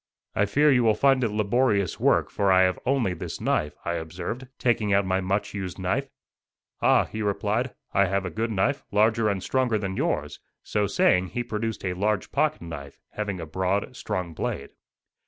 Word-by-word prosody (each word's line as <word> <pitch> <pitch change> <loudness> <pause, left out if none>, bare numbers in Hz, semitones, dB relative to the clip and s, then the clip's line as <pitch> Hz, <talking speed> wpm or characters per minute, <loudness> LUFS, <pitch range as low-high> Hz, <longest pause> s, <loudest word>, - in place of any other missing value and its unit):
"I 105 - +2
fear 145 +8 +4
you 125 -3 +4
will 110 -2 +4
find 135 +2 +3
it 115 - +2
laborious 105 -2 +1
work, - - +2
for 100 -1 +2
I 95 0 +6
have 95 0 +1
only 130 -8 +2
this 90 - -6
knife," 75 - 0
I 85 - 0
observed, 85 +10 -5
taking 110 -4 +1
out 100 0 +3
my 95 0 +1
much 100 +2 -1
used 95 -3 -5
knife. 95 -1 -1 0.7
"Ah," - - +4
he 110 - -6
replied, 105 +4 -1 0.2
"I 100 - +4
have 100 +1 -1
a 90 - -4
good 115 +7 -2
knife, 115 +7 0
larger 110 +2 +3
and 100 -2 -2
stronger 130 -4 +1
than 100 -2 -3
yours;" - - -1 0.2
so 105 -1 0
saying 95 -2 +3
he 120 +6 -3
produced 110 -2 -3
a 90 - 0
large 100 +2 -1
pocket 155 - +1
knife, 70 -4 -8
having 100 -3 -3
a 80 - -5
broad, 95 +8 -1
strong 90 -8 -3
blade. - - -4
100 Hz, 190 wpm, -26 LUFS, 95-115 Hz, 0.7 s, I